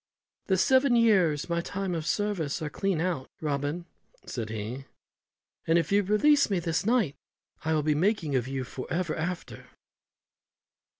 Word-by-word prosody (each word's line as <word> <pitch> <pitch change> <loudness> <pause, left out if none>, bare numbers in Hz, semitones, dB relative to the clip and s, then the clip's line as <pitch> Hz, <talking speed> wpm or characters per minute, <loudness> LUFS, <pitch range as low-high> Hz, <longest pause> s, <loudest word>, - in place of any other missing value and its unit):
"The 190 - +2
seven 260 +5 +4
years 190 -11 +3
my 170 0 0
time 190 +1 -3
of 160 -1 -3
service 200 -9 -1
are 150 - -4
clean 195 -1 -1
out, 170 -6 -2
Robin," 145 +3 -2 0.4
said 115 -3 -4
he, 110 +5 -5 0.8
"and 165 +1 +4
if 170 - 0
you 200 +1 +5
release 250 +9 +4
me 195 - +1
this 165 -2 -1
night 225 - +2 0.5
I 160 0 +1
will 155 - +1
be 155 0 +2
the 150 - -1
making 175 -6 +1
of 125 -1 0
you 135 -1 -3
for 130 0 -8
ever 170 -2 -1
after." 170 +2 -5
170 Hz, 165 wpm, -28 LUFS, 145-195 Hz, 0.8 s, you